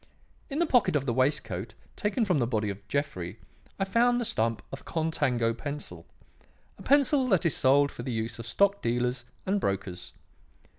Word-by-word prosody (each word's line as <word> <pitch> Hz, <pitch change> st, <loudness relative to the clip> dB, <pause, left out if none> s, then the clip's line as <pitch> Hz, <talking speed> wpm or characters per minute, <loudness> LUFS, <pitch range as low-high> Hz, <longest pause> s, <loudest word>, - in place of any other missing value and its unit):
In 280 Hz, -, -3 dB
the 340 Hz, -, +3 dB
pocket 245 Hz, -, +3 dB
of 140 Hz, -2 st, +1 dB
the 120 Hz, -, 0 dB
waistcoat 115 Hz, -6 st, -1 dB, 0.2 s
taken 215 Hz, +3 st, 0 dB
from 180 Hz, -7 st, +2 dB
the 120 Hz, -, +1 dB
body 110 Hz, -3 st, 0 dB
of 100 Hz, +1 st, -11 dB
Jeffrey 105 Hz, -11 st, -3 dB, 0.4 s
I 195 Hz, -, 0 dB
found 240 Hz, +5 st, +3 dB
the 240 Hz, -, -1 dB
stump 115 Hz, -, 0 dB
of -, -, -7 dB
a -, -, -20 dB
'Contango' 130 Hz, -8 st, 0 dB
pencil; 140 Hz, -, -6 dB, 0.7 s
a -, -, -10 dB
pencil 280 Hz, -1 st, +3 dB
that 190 Hz, -8 st, +2 dB
is 170 Hz, -, +3 dB
sold 140 Hz, +2 st, +4 dB
for -, -, -8 dB
the 130 Hz, +1 st, -4 dB
use 115 Hz, 0 st, -3 dB
of 115 Hz, -, -7 dB
stock 200 Hz, -, +2 dB
dealers 120 Hz, +1 st, -1 dB, 0.2 s
and 195 Hz, +1 st, +1 dB
brokers. 90 Hz, -, -3 dB
135 Hz, 185 wpm, -28 LUFS, -, 0.7 s, sold